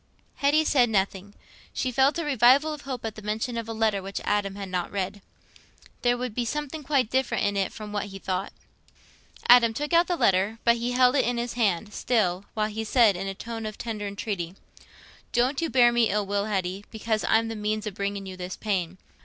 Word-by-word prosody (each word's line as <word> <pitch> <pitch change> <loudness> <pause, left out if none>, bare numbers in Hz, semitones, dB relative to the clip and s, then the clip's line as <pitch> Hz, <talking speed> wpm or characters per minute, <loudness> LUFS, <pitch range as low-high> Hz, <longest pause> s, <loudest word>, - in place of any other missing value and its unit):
Hetty 295 +3 +3
said 250 -5 +3
nothing; 195 -1 -1 0.4
she 255 - -1
felt 270 +5 +3
a 335 - -2
revival 275 +3 +4
of 300 - -8
hope 260 -4 -5
at 220 - -3
the 215 - -10
mention 215 +3 -3
of 230 -1 -4
a - - -2
letter 220 -3 +1
which 195 +1 -5
Adam 205 -1 0
had 200 -1 -6
not 180 -1 -2
read. 200 0 -3 0.8
There 245 0 +2
would 250 -2 -4
be 245 - -1
something 295 +4 -4
quite 270 -5 0
different 260 -4 +1
in 205 0 0
it 195 -1 0
from 210 -1 -8
what 205 -1 -1
he 195 -1 -8
thought. 190 0 -3 1.0
Adam 235 -2 +7
took 295 +5 -3
out 340 +1 +5
the 355 - 0
letter, 195 - +2
but 235 0 +4
he 240 +1 -2
held 250 +1 +4
it - - +3
in 245 0 0
his 235 0 -2
hand 210 -3 0
still, 200 -6 0
while 215 -1 0
he 220 +1 -4
said, 220 -2 +4
in 190 +2 -4
a 195 - -4
tone 225 +1 -6
of 215 - -7
tender 215 -3 -4
entreaty, 200 -3 -4 0.8
"Don't 255 +5 +1
you 330 - -1
bear 245 -3 +5
me 235 -2 +3
ill 205 +1 0
will, 200 +1 -1
Hetty, 190 -2 -2
because 220 -1 -2
I'm 225 +1 +3
the 225 - -4
means 215 0 -2
o' 215 - -3
bringing 200 0 -4
you 190 -1 -7
this 180 0 -6
pain. 185 -4 -2
220 Hz, 220 wpm, -26 LUFS, 200-245 Hz, 1.0 s, Adam